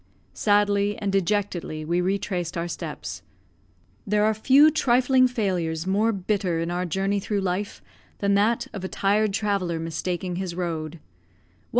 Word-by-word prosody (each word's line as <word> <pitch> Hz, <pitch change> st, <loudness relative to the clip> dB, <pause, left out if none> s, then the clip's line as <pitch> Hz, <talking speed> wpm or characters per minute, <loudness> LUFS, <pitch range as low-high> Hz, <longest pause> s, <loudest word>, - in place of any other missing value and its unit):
Sadly 205 Hz, 0 st, +2 dB
and 200 Hz, -1 st, -2 dB
dejectedly 190 Hz, -5 st, -1 dB
we 170 Hz, +3 st, +1 dB
retraced 180 Hz, -2 st, -2 dB
our 170 Hz, +1 st, -2 dB
steps. -, -, -6 dB, 0.9 s
There 210 Hz, +1 st, +2 dB
are 220 Hz, -, +3 dB
few 270 Hz, +8 st, +5 dB
trifling 255 Hz, -2 st, +3 dB
failures 180 Hz, -9 st, -2 dB
more 205 Hz, +4 st, +2 dB
bitter 190 Hz, -3 st, -1 dB
in 165 Hz, +1 st, -2 dB
our 180 Hz, +1 st, -2 dB
journey 195 Hz, +4 st, 0 dB
through 200 Hz, +1 st, -2 dB
life 190 Hz, +2 st, -3 dB, 0.3 s
than 200 Hz, 0 st, +1 dB
that 210 Hz, +4 st, +2 dB
of 200 Hz, -3 st, -6 dB
a -, -, -2 dB
tired 205 Hz, +2 st, +1 dB
traveller 195 Hz, -5 st, -1 dB
mistaking 175 Hz, +2 st, -3 dB
his 185 Hz, -2 st, -4 dB
road. 165 Hz, -2 st, -4 dB
195 Hz, 140 wpm, -25 LUFS, 175-210 Hz, 0.9 s, few